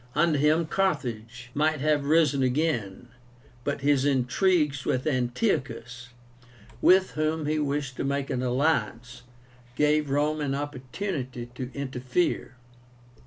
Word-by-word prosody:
Under 155 -2 +3
him 155 +3 +3
Carthage 125 - -2
might 155 +1 +1
have 150 0 +1
risen 150 -3 +3
again. 125 -6 -1 0.5
But 145 0 -2
his 140 -1 +3
intrigues 145 +2 +2
with 130 0 -1
Antiochus, 125 - -1 0.7
with 190 +1 +5
whom 155 0 -1
he 155 +1 0
wished 140 -3 -2
to - - -2
make 140 0 -2
an 125 - -1
alliance, 125 -3 -1 0.5
gave 150 0 +2
Rome 150 +2 +1
an 140 -2 -1
opportunity 130 -2 -5
to 125 0 -5
interfere. 130 +1 -2
140 Hz, 120 wpm, -27 LUFS, 125-155 Hz, 0.7 s, with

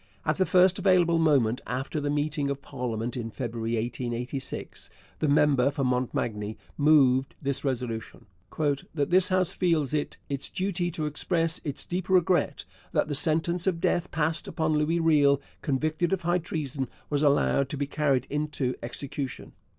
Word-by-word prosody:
At 155 - +1
the 190 - +2
first 185 +1 +4
available 175 -3 +4
moment 135 -7 +3
after 135 +4 -3
the 145 - -1
meeting 145 -1 0
of 140 0 -4
parliament 120 -3 -4
in 115 -3 -4
February 115 -1 -3
1886, 125 +3 -4 0.3
the 155 - +1
member 140 -2 +4
for 140 -1 -2
Montmagny 115 -4 -1 0.2
moved 140 -3 +4
this 140 -2 -1
resolution: 125 -5 -3 0.3
'That 145 0 -1
this 185 +1 +5
House 185 -2 +2
feels 160 -6 +1
it 150 -1 -2
its 140 -1 -3
duty 185 -2 -1
to 155 -2 -3
express 165 +2 0
its 145 -3 -3
deep 180 +1 -4
regret 180 -1 +2 0.3
that - - +1
the - - -1
sentence 165 +4 +1
of 175 -3 +1
death 175 +1 0
passed 160 +1 -1
upon 155 -1 0
Louis 155 +3 +1
Riel 145 -4 +4 0.2
convicted 155 +5 0
of 190 - -1
high 175 +1 +2
treason 145 -5 -3 0.2
was 145 -1 +1
allowed 140 -2 +3
to 145 - -4
be 140 - -1
carried 140 -3 +1
into 145 -3 -1
execution.' 135 +2 -5
145 Hz, 160 wpm, -27 LUFS, 130-165 Hz, 0.3 s, this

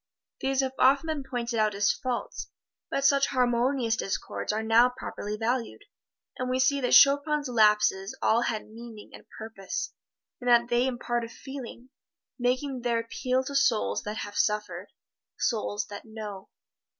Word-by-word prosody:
These 270 0 +1
have 265 -1 -2
often 275 +4 +4
been 310 -3 -3
pointed 240 -3 -3
out 215 -1 +2
as 205 0 +3
faults, 255 -2 -4 0.4
but 275 - -1
such 275 0 +4
harmonious 245 -1 +1
discords 195 -1 -3
are 215 +1 -2
now 230 +3 +5
properly 210 -4 -6
valued, 235 +2 -2 0.6
and 255 0 -2
we 255 - +1
see 275 +2 +2
that 250 - 0
Chopin's 285 +1 +5
lapses 210 -4 +2
all 225 +2 +3
had 220 -3 -2
meaning 225 -1 -11
and - - -13
purpose, 220 -4 -5 0.5
in 245 - -6
that 240 0 +5
they 240 +2 +2
impart 240 -1 -2
a 230 - -6
feeling 260 -1 -9 0.5
making 255 +1 -1
their 235 -1 0
appeal 255 +3 -1
to 280 - -6
souls 235 -5 +2
that 210 +1 -5
have 205 -1 -6
suffered 205 -3 -1 0.5
souls 210 -3 -1
that 205 - -6
know. 215 -3 -8
240 Hz, 155 wpm, -27 LUFS, 215-260 Hz, 0.6 s, now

